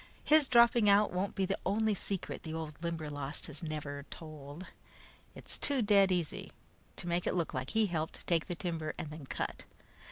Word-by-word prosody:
His 305 Hz, -2 st, +6 dB
dropping 235 Hz, -3 st, +6 dB
out 200 Hz, -1 st, +5 dB
won't 190 Hz, +2 st, -1 dB
be 195 Hz, -, +1 dB
the 195 Hz, +1 st, -1 dB
only 215 Hz, +3 st, +2 dB
secret 195 Hz, -1 st, -4 dB
the 160 Hz, -1 st, -5 dB
old 160 Hz, -2 st, -6 dB
Limberlost 150 Hz, -4 st, -3 dB
has 150 Hz, -2 st, -9 dB
never 150 Hz, -3 st, -4 dB
told. 155 Hz, +1 st, -9 dB, 0.7 s
It's -, -, -6 dB
too 275 Hz, -4 st, +2 dB
dead 200 Hz, -2 st, +5 dB
easy 175 Hz, -4 st, -1 dB, 0.4 s
to 175 Hz, -, -6 dB
make 175 Hz, 0 st, 0 dB
it -, -, +1 dB
look 170 Hz, -3 st, -1 dB
like 130 Hz, 0 st, -3 dB
he 220 Hz, +5 st, +3 dB
helped 160 Hz, -4 st, -3 dB
take 165 Hz, -2 st, +1 dB
the 175 Hz, -, -3 dB
timber 165 Hz, -3 st, -3 dB
and 155 Hz, -, -5 dB
then 150 Hz, -3 st, -9 dB
cut. -, -, -3 dB
170 Hz, 185 wpm, -33 LUFS, 155-200 Hz, 0.7 s, His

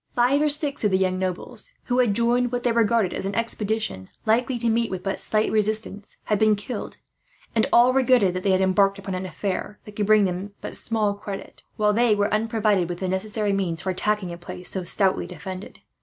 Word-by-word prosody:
Five 250 Hz, +4 st, +3 dB
or 300 Hz, -, +3 dB
six 290 Hz, -2 st, -1 dB
of 210 Hz, -, +4 dB
the 190 Hz, -, +2 dB
young 185 Hz, -1 st, 0 dB
nobles, 185 Hz, -, -4 dB
who 250 Hz, 0 st, 0 dB
had 230 Hz, -5 st, +3 dB
joined 240 Hz, +2 st, +2 dB
what 245 Hz, -1 st, -2 dB
they 245 Hz, -, +2 dB
regarded 230 Hz, -4 st, +2 dB
as 195 Hz, -, -3 dB
an 200 Hz, -, -4 dB
expedition 220 Hz, -, -2 dB, 0.2 s
likely 245 Hz, +3 st, +2 dB
to 235 Hz, 0 st, -2 dB
meet 230 Hz, +1 st, +1 dB
with 185 Hz, -1 st, -5 dB
but 195 Hz, -, -2 dB
slight 215 Hz, 0 st, 0 dB
resistance, 215 Hz, -1 st, -1 dB
had 210 Hz, -2 st, 0 dB
been 215 Hz, -1 st, +4 dB
killed; 210 Hz, +2 st, -6 dB, 0.6 s
and 225 Hz, -, +2 dB
all 245 Hz, +2 st, +6 dB
regretted 255 Hz, -8 st, +3 dB
that 185 Hz, -, -3 dB
they 195 Hz, -, 0 dB
had 190 Hz, 0 st, +3 dB
embarked 195 Hz, +1 st, +3 dB
upon 195 Hz, -1 st, -6 dB
an 185 Hz, 0 st, -3 dB
affair 190 Hz, +4 st, -4 dB
that 210 Hz, -, -11 dB
could 205 Hz, -1 st, -1 dB
bring 215 Hz, -1 st, +5 dB
them 190 Hz, +2 st, -4 dB
but -, -, -6 dB
small 215 Hz, -3 st, +1 dB
credit, 200 Hz, -1 st, -8 dB, 0.2 s
while 210 Hz, -1 st, +3 dB
they 230 Hz, 0 st, +3 dB
were 205 Hz, 0 st, 0 dB
unprovided 215 Hz, -5 st, +1 dB
with 175 Hz, -, -4 dB
the 185 Hz, -, -3 dB
necessary 205 Hz, +2 st, -1 dB
means 180 Hz, -4 st, -2 dB
for 190 Hz, -, -1 dB
attacking 190 Hz, -1 st, -1 dB
a 170 Hz, -, -9 dB
place 180 Hz, +1 st, -5 dB
so 190 Hz, -, +1 dB
stoutly 190 Hz, 0 st, +1 dB
defended. 185 Hz, +2 st, -8 dB
210 Hz, 215 wpm, -24 LUFS, 190-230 Hz, 0.6 s, all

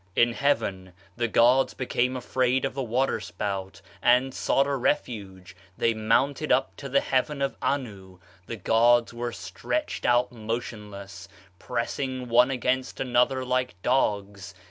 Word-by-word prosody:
In 120 Hz, 0 st, +4 dB
heaven 95 Hz, -10 st, -1 dB, 0.2 s
the 120 Hz, 0 st, 0 dB
gods 125 Hz, +4 st, +4 dB
became 125 Hz, 0 st, -1 dB
afraid 130 Hz, +1 st, 0 dB
of 135 Hz, -, -3 dB
the 135 Hz, -, -3 dB
water 125 Hz, +1 st, 0 dB
spout, 95 Hz, 0 st, -5 dB, 0.2 s
and 125 Hz, +2 st, +3 dB
sought 135 Hz, -, +2 dB
a 140 Hz, 0 st, -1 dB
refuge; 100 Hz, -9 st, -3 dB, 0.2 s
they 115 Hz, -, +2 dB
mounted 130 Hz, +7 st, +1 dB
up -, -, +2 dB
to 140 Hz, -, -7 dB
the 140 Hz, +2 st, +3 dB
heaven 140 Hz, +2 st, 0 dB
of 140 Hz, 0 st, -1 dB
Anu. 100 Hz, -9 st, -3 dB, 0.3 s
The 115 Hz, -, -4 dB
gods 115 Hz, +3 st, +3 dB
were 120 Hz, 0 st, -3 dB
stretched 310 Hz, -, -4 dB
out 125 Hz, +1 st, +3 dB
motionless, 105 Hz, -5 st, -6 dB, 0.3 s
pressing 125 Hz, +1 st, -3 dB
one 120 Hz, +2 st, +5 dB
against 130 Hz, 0 st, -1 dB
another 130 Hz, +1 st, +1 dB
like 125 Hz, -7 st, -1 dB
dogs. 100 Hz, -6 st, -1 dB
120 Hz, 140 wpm, -26 LUFS, 105-130 Hz, 0.3 s, one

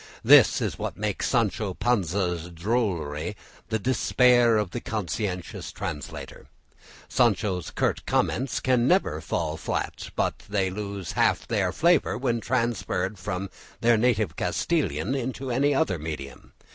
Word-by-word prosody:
This -, -, +7 dB
is -, -, -2 dB
what -, -, -4 dB
makes 105 Hz, -1 st, -1 dB
Sancho 105 Hz, -5 st, 0 dB
Panza's 90 Hz, -6 st, 0 dB
drollery 85 Hz, -3 st, -2 dB, 0.3 s
the 110 Hz, -, +1 dB
despair 120 Hz, 0 st, +4 dB
of 105 Hz, -4 st, -1 dB
the 120 Hz, -, -4 dB
conscientious 95 Hz, -2 st, -4 dB
translator. 75 Hz, -4 st, -7 dB, 0.6 s
Sancho's 105 Hz, -7 st, +1 dB
curt -, -, -1 dB
comments 130 Hz, +2 st, 0 dB
can 125 Hz, -1 st, +2 dB
never 155 Hz, -, +2 dB
fall -, -, -2 dB
flat, -, -, -3 dB
but -, -, 0 dB
they 95 Hz, -2 st, 0 dB
lose 100 Hz, -1 st, -5 dB
half -, -, +1 dB
their -, -, +1 dB
flavour 170 Hz, +3 st, +2 dB
when 120 Hz, -2 st, 0 dB
transferred 110 Hz, -6 st, -1 dB
from 95 Hz, 0 st, -4 dB, 0.3 s
their 120 Hz, 0 st, +5 dB
native 110 Hz, -6 st, +1 dB
Castilian 90 Hz, -, 0 dB
into 130 Hz, 0 st, -3 dB
any 140 Hz, +4 st, +2 dB
other 90 Hz, -9 st, +1 dB
medium. 75 Hz, -3 st, -7 dB
105 Hz, 130 wpm, -26 LUFS, 90-120 Hz, 0.6 s, This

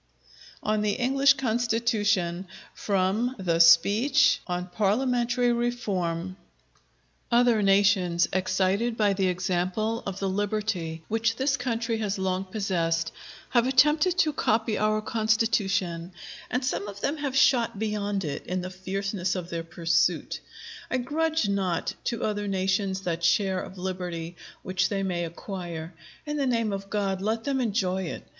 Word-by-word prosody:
_] -, -, -38 dB, 0.4 s
ON 215 Hz, 0 st, +1 dB
THE 210 Hz, -1 st, 0 dB
ENGLISH 270 Hz, +2 st, +4 dB
CONSTITUTION 220 Hz, -7 st, 0 dB, 0.3 s
From 205 Hz, +6 st, 0 dB
the 170 Hz, -4 st, 0 dB
'Speech 205 Hz, -, +5 dB
on 180 Hz, 0 st, -2 dB
Parliamentary 240 Hz, +4 st, +1 dB
Reform' 190 Hz, -7 st, -2 dB, 0.9 s
Other 240 Hz, -2 st, +4 dB
nations, 195 Hz, -3 st, +3 dB
excited 190 Hz, +5 st, +1 dB
by 205 Hz, -2 st, +3 dB
the 190 Hz, -1 st, +1 dB
example 185 Hz, +5 st, -1 dB
of 195 Hz, -1 st, -4 dB
the 195 Hz, -, -2 dB
liberty 195 Hz, -5 st, -2 dB
which 225 Hz, +1 st, 0 dB
this 270 Hz, +3 st, +1 dB
country 235 Hz, -3 st, -2 dB
has 205 Hz, -2 st, -2 dB
long 190 Hz, 0 st, -1 dB
possessed, 170 Hz, -5 st, -1 dB, 0.4 s
have 240 Hz, 0 st, +3 dB
attempted 300 Hz, +7 st, +4 dB
to 310 Hz, -4 st, +3 dB
copy 220 Hz, -3 st, +1 dB
our 215 Hz, 0 st, +1 dB
Constitution; 205 Hz, -6 st, 0 dB, 0.4 s
and 250 Hz, +2 st, -1 dB
some 210 Hz, -5 st, -2 dB
of 200 Hz, 0 st, -8 dB
them 290 Hz, +3 st, -1 dB
have 280 Hz, -3 st, -3 dB
shot 235 Hz, -5 st, +3 dB
beyond 205 Hz, -2 st, -2 dB
it 145 Hz, -, -4 dB
in 185 Hz, 0 st, -2 dB
the 185 Hz, +1 st, -6 dB
fierceness 190 Hz, 0 st, -3 dB
of 180 Hz, -2 st, -5 dB
their 165 Hz, -1 st, -3 dB
pursuit. 165 Hz, 0 st, 0 dB, 0.5 s
I -, -, 0 dB
grudge 310 Hz, +1 st, 0 dB
not 190 Hz, -4 st, -1 dB
to 235 Hz, -3 st, -2 dB
other 205 Hz, -1 st, -1 dB
nations 190 Hz, 0 st, 0 dB
that 170 Hz, -2 st, -3 dB
share 190 Hz, +2 st, +2 dB
of 190 Hz, -, -9 dB
liberty 180 Hz, -2 st, -4 dB, 0.3 s
which 185 Hz, -1 st, 0 dB
they 195 Hz, -1 st, -1 dB
may 175 Hz, -2 st, -1 dB
acquire: 170 Hz, -1 st, -6 dB, 0.3 s
in 295 Hz, 0 st, -3 dB
the 275 Hz, -2 st, 0 dB
name 230 Hz, -4 st, 0 dB
of 195 Hz, 0 st, -5 dB
God, 195 Hz, -2 st, -1 dB
let 220 Hz, +2 st, -1 dB
them 275 Hz, -2 st, 0 dB
enjoy 195 Hz, -5 st, 0 dB
it! 160 Hz, -, -6 dB
200 Hz, 145 wpm, -26 LUFS, 185-230 Hz, 0.9 s, Speech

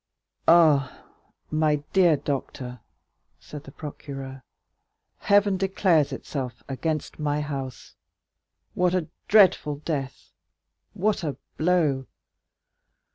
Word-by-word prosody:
"Ah, 155 Hz, -6 st, +4 dB, 0.5 s
my 155 Hz, -1 st, +2 dB, 0.2 s
dear 175 Hz, -5 st, +5 dB
doctor," 130 Hz, -3 st, -4 dB, 0.6 s
said 150 Hz, -1 st, -10 dB
the 135 Hz, -, -11 dB
procureur, 135 Hz, -3 st, -8 dB, 0.8 s
"Heaven 200 Hz, -1 st, +3 dB
declares 185 Hz, -6 st, +2 dB
itself 130 Hz, -2 st, -5 dB
against 155 Hz, +4 st, -3 dB
my 150 Hz, -1 st, 0 dB
house! 135 Hz, -3 st, -6 dB, 0.8 s
What 180 Hz, 0 st, +1 dB
a 170 Hz, -4 st, -1 dB, 0.2 s
dreadful 190 Hz, -8 st, +5 dB
death—what 155 Hz, +7 st, -5 dB
a 150 Hz, -4 st, -3 dB, 0.2 s
blow! 155 Hz, -6 st, +1 dB
150 Hz, 85 wpm, -25 LUFS, 135-175 Hz, 0.8 s, dear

